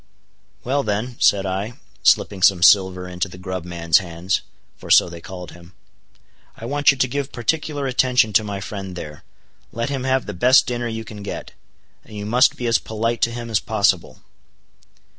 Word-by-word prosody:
"Well 140 Hz, +3 st, 0 dB
then," 110 Hz, +2 st, -3 dB
said 100 Hz, -1 st, +3 dB
I, 95 Hz, +5 st, -3 dB, 0.3 s
slipping 95 Hz, -2 st, +2 dB
some 90 Hz, -2 st, +4 dB
silver 95 Hz, -2 st, +4 dB
into 90 Hz, +1 st, -3 dB
the 90 Hz, -, -12 dB
grub 95 Hz, -1 st, -5 dB
man's 85 Hz, -2 st, +2 dB
hands 90 Hz, +2 st, -2 dB, 0.3 s
(for -, -, -13 dB
so -, -, +6 dB
they 85 Hz, -1 st, -10 dB
called 90 Hz, -3 st, -9 dB
him). 85 Hz, +1 st, -16 dB, 0.8 s
"I 115 Hz, -, -8 dB
want 145 Hz, +2 st, +2 dB
you 135 Hz, -, +4 dB
to 130 Hz, -, +2 dB
give 140 Hz, +2 st, -4 dB
particular 145 Hz, +3 st, -2 dB
attention 125 Hz, -4 st, +2 dB
to 110 Hz, -, +4 dB
my 100 Hz, -2 st, -5 dB
friend 95 Hz, -3 st, -7 dB
there; 75 Hz, -4 st, -9 dB, 0.5 s
let 115 Hz, +3 st, -3 dB
him 135 Hz, -2 st, -3 dB
have 130 Hz, 0 st, +1 dB
the 105 Hz, -, -6 dB
best 125 Hz, +9 st, +5 dB
dinner 120 Hz, -1 st, -3 dB
you 115 Hz, -1 st, -5 dB
can 105 Hz, -2 st, -10 dB
get. 100 Hz, -, -7 dB, 0.5 s
And 105 Hz, -, -11 dB
you 105 Hz, -, -5 dB
must 125 Hz, +4 st, +3 dB
be 125 Hz, -, -5 dB
as 115 Hz, -2 st, +3 dB
polite 115 Hz, +1 st, -3 dB
to 120 Hz, -, +2 dB
him 120 Hz, -1 st, -6 dB
as 110 Hz, -, +3 dB
possible." 100 Hz, -5 st, 0 dB
105 Hz, 185 wpm, -21 LUFS, 95-120 Hz, 0.8 s, so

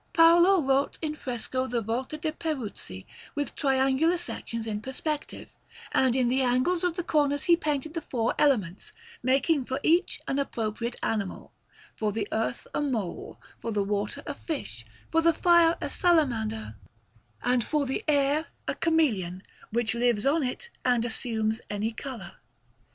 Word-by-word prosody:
Paolo 345 Hz, +2 st, +6 dB
wrought 270 Hz, +1 st, +1 dB
in 305 Hz, -1 st, -1 dB
fresco 255 Hz, -2 st, -3 dB
the 245 Hz, -2 st, 0 dB
Volta 240 Hz, +7 st, -3 dB
de' 310 Hz, +1 st, -2 dB
Peruzzi, 255 Hz, -, -5 dB, 0.3 s
with 290 Hz, -3 st, -2 dB
triangular 270 Hz, +5 st, +2 dB
sections 230 Hz, -9 st, -4 dB
in 210 Hz, -2 st, -3 dB
perspective, 290 Hz, +4 st, -4 dB, 0.4 s
and 260 Hz, -2 st, +3 dB
in 255 Hz, -2 st, +3 dB
the 260 Hz, +2 st, +2 dB
angles 255 Hz, +8 st, +2 dB
of 355 Hz, -2 st, +1 dB
the 350 Hz, -, -2 dB
corners 290 Hz, -3 st, +1 dB
he 345 Hz, -, +6 dB
painted 305 Hz, -2 st, -2 dB
the 330 Hz, -, -3 dB
four 235 Hz, -5 st, -1 dB
elements, 210 Hz, -, +1 dB, 0.3 s
making 275 Hz, +3 st, +2 dB
for 260 Hz, +2 st, -3 dB
each 340 Hz, +3 st, +3 dB
an 275 Hz, -, 0 dB
appropriate 235 Hz, -2 st, -2 dB
animal 205 Hz, -4 st, -2 dB, 0.4 s
for 215 Hz, -1 st, -1 dB
the 210 Hz, 0 st, -2 dB
earth 225 Hz, +2 st, -1 dB
a -, -, 0 dB
mole, 230 Hz, -11 st, -3 dB, 0.2 s
for 230 Hz, -, -4 dB
the 205 Hz, -2 st, +1 dB
water 205 Hz, +6 st, -2 dB
a 290 Hz, -, -3 dB
fish, 270 Hz, -, -5 dB, 0.3 s
for 325 Hz, -, +4 dB
the 335 Hz, 0 st, +4 dB
fire 340 Hz, 0 st, +5 dB
a -, -, -2 dB
salamander, 225 Hz, -, +1 dB, 0.7 s
and 245 Hz, -1 st, +2 dB
for 300 Hz, +2 st, 0 dB
the 265 Hz, -, -2 dB
air 290 Hz, +1 st, +2 dB, 0.2 s
a -, -, +1 dB
chameleon, 210 Hz, -, +1 dB, 0.3 s
which 225 Hz, -2 st, 0 dB
lives 235 Hz, -2 st, +1 dB
on 300 Hz, +4 st, +3 dB
it 385 Hz, -, -4 dB
and 245 Hz, -2 st, +2 dB
assumes 225 Hz, -2 st, -1 dB
any 210 Hz, +2 st, -1 dB
colour. 230 Hz, -6 st, -8 dB
260 Hz, 155 wpm, -28 LUFS, 225-310 Hz, 0.7 s, Paolo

